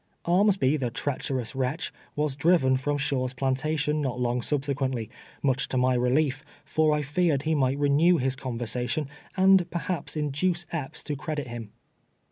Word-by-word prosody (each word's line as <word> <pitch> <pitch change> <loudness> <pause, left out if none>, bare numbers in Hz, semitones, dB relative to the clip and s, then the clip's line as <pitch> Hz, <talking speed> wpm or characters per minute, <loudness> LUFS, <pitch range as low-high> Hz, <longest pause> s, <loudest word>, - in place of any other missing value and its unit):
Armsby, 180 -5 +3
the 125 -3 -1
treacherous 130 -1 -3
wretch, 130 +5 -2 0.2
was 150 -2 0
driven 140 -3 +3
from 145 +3 -1
Shaw's 135 -2 -1
planta 135 +4 0
tion 150 +1 0
not 130 -3 -2
long 120 0 0
subsequently, 135 -4 -1 0.3
much 135 -2 +2
to 130 - -2
my 130 0 +3
relief, 135 +3 +1 0.2
for 155 -1 +2
I 150 0 +1
feared 150 -1 +1
he 160 +1 +1
might 135 -2 +2
renew 145 +5 +4
his 130 -1 0
conversation, 125 +2 -2 0.3
and 190 -1 +5
perhaps 170 -2 -3
induce 155 +4 0
Epps 150 -3 -5
to 150 - -3
credit 145 -2 -4
him. 115 -3 -6
140 Hz, 155 wpm, -27 LUFS, 130-155 Hz, 0.3 s, and